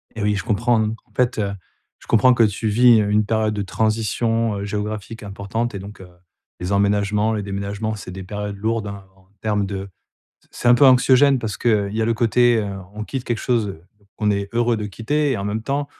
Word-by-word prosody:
Eh 110 Hz, -, -5 dB
oui, 105 Hz, 0 st, +2 dB
je 95 Hz, -, -3 dB
comprends, 115 Hz, +2 st, +1 dB
en 110 Hz, +1 st, -5 dB
fait, 125 Hz, -3 st, +1 dB
heu, 100 Hz, -1 st, -1 dB, 0.5 s
je -, -, -18 dB
comprends 125 Hz, +3 st, +5 dB
que 120 Hz, -, +4 dB
tu 105 Hz, +1 st, 0 dB
vis, 115 Hz, +1 st, +5 dB
heu, 105 Hz, -, -1 dB
une 105 Hz, +1 st, +2 dB
période 110 Hz, 0 st, 0 dB
de 105 Hz, -, -2 dB
transition, 110 Hz, +1 st, 0 dB
heu, -, -, -4 dB
géographique 105 Hz, +2 st, -5 dB
importante 100 Hz, +4 st, -3 dB
et 100 Hz, -, -4 dB
donc 100 Hz, 0 st, -10 dB
heu, 90 Hz, -, -12 dB, 0.5 s
les 90 Hz, +2 st, -4 dB
emménagements, 105 Hz, +2 st, +1 dB
les 105 Hz, -, -2 dB
déménagements, 100 Hz, +2 st, -3 dB
c'est 90 Hz, -2 st, -9 dB
des 95 Hz, 0 st, -7 dB
périodes 105 Hz, +1 st, -5 dB
lourdes, 110 Hz, 0 st, -1 dB
hein, 100 Hz, -1 st, -8 dB
en 95 Hz, 0 st, -26 dB
termes 105 Hz, -2 st, 0 dB
de 95 Hz, 0 st, -5 dB, 0.5 s
c -, -, -30 dB
c'est 120 Hz, -, -1 dB
un 120 Hz, -, +8 dB
peu 135 Hz, +3 st, +6 dB
anxiogène 130 Hz, +1 st, +5 dB
parce 110 Hz, -3 st, -4 dB
qu'il 105 Hz, -4 st, +1 dB
y 110 Hz, +1 st, -1 dB
a -, -, +2 dB
le 115 Hz, 0 st, +1 dB
côté, 120 Hz, 0 st, +3 dB
heu, 100 Hz, -2 st, -3 dB, 0.2 s
on 105 Hz, 0 st, -5 dB
quitte 130 Hz, +1 st, -5 dB
quelque 120 Hz, -2 st, -2 dB
chose 110 Hz, -7 st, -1 dB, 0.4 s
qu'on 105 Hz, -1 st, +1 dB
est 100 Hz, 0 st, -1 dB
heureux 120 Hz, 0 st, +1 dB
de 105 Hz, -1 st, -4 dB
quitter 140 Hz, +8 st, -1 dB
et -, -, -1 dB
en 100 Hz, -, -4 dB
même 105 Hz, +2 st, -2 dB
temps, 140 Hz, +3 st, -2 dB
110 Hz, 225 wpm, -21 LUFS, 100-115 Hz, 0.5 s, un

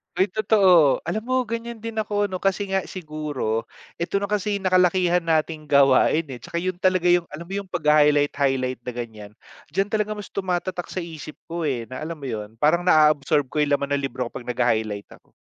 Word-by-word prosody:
Ay 185 Hz, +1 st, +1 dB
totoo 190 Hz, -9 st, +4 dB
alam 170 Hz, +7 st, -2 dB
mo 255 Hz, 0 st, +1 dB
ganiyan 230 Hz, 0 st, -6 dB
din 230 Hz, -1 st, -6 dB
ako 205 Hz, -1 st, 0 dB
ano, 185 Hz, -, -3 dB
kasi 195 Hz, +1 st, -1 dB
nga 190 Hz, -1 st, 0 dB
siguro 150 Hz, -10 st, -3 dB, 0.3 s
ito 170 Hz, +3 st, -3 dB
na 200 Hz, -, -3 dB
kasi 210 Hz, 0 st, 0 dB
yung 195 Hz, -1 st, -5 dB
nakalakihan 180 Hz, -1 st, +3 dB
nating 155 Hz, -1 st, -1 dB
gawain, 140 Hz, +3 st, +4 dB
eh, 125 Hz, -, -7 dB
tsaka 170 Hz, +8 st, -4 dB
'yun 185 Hz, 0 st, -2 dB
talaga 185 Hz, -2 st, +2 dB
'yung 175 Hz, -1 st, +2 dB
alam 155 Hz, +3 st, -8 dB
mo 195 Hz, -, -7 dB
'yung 200 Hz, -1 st, -5 dB
pag-ha-highlight 150 Hz, -3 st, +3 dB
highlight 130 Hz, -3 st, 0 dB
na 125 Hz, -, -4 dB
ganiyan, 110 Hz, -4 st, -7 dB, 0.4 s
diyan 195 Hz, +2 st, 0 dB
talaga 215 Hz, -1 st, 0 dB
mas 205 Hz, -2 st, -9 dB
tumatatak 185 Hz, -2 st, -3 dB
sa 185 Hz, -, -4 dB
isip 155 Hz, -2 st, -9 dB
ko, 170 Hz, -1 st, -3 dB
eh, 120 Hz, -4 st, -2 dB
na 130 Hz, -, -6 dB
alam 165 Hz, +2 st, -4 dB
mo 140 Hz, -, -9 dB
'yun 105 Hz, -1 st, -6 dB
parang 170 Hz, +6 st, +2 dB
na-a-absorb 150 Hz, -2 st, +4 dB
ko 150 Hz, -, -1 dB
'yung 145 Hz, -1 st, +1 dB
laman 140 Hz, 0 st, -3 dB
ng 140 Hz, -, -5 dB
libro 130 Hz, -1 st, -3 dB
ko -, -, -35 dB
pag -, -, -16 dB
nagha-highlight 110 Hz, -4 st, -1 dB
ako. -, -, -34 dB
165 Hz, 205 wpm, -23 LUFS, 140-190 Hz, 0.4 s, totoo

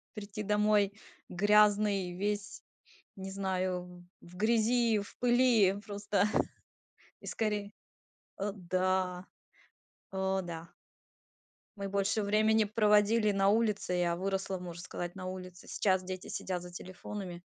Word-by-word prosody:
прийти 210 Hz, 0 st, -6 dB
домой 210 Hz, -1 st, +3 dB, 0.4 s
грязный 205 Hz, -1 st, +3 dB
весь, 205 Hz, +2 st, -3 dB, 0.5 s
не 190 Hz, 0 st, -6 dB
знаю, 185 Hz, -2 st, -3 dB, 0.2 s
в 175 Hz, +1 st, -15 dB
грязи, 230 Hz, +2 st, +3 dB
в 200 Hz, -, -7 dB
пыли 240 Hz, -5 st, +4 dB
просто 205 Hz, -1 st, 0 dB, 1.0 s
и -, -, -12 dB
скорее. 210 Hz, -2 st, -2 dB, 0.7 s
Э, 200 Hz, +1 st, -1 dB
да! 185 Hz, 0 st, 0 dB, 0.9 s
О 190 Hz, 0 st, 0 dB
да! 170 Hz, -1 st, -7 dB, 1.1 s
Мы 200 Hz, 0 st, -4 dB
больше 200 Hz, +2 st, 0 dB
времени 215 Hz, +2 st, +3 dB
проводили 210 Hz, 0 st, +3 dB
на 195 Hz, 0 st, +3 dB
улице. 210 Hz, -4 st, +1 dB
Я 175 Hz, -1 st, +1 dB
выросла, 190 Hz, +1 st, -2 dB
можно 175 Hz, -1 st, -7 dB
сказать, 175 Hz, -1 st, -6 dB
на 185 Hz, -1 st, -6 dB
улице. 185 Hz, -1 st, -8 dB
Сейчас 185 Hz, -2 st, +1 dB
дети 185 Hz, 0 st, -6 dB
сидят 180 Hz, -2 st, -3 dB
за 180 Hz, -, -9 dB
телефонами. 180 Hz, 0 st, -7 dB
195 Hz, 115 wpm, -32 LUFS, 185-210 Hz, 1.1 s, пыли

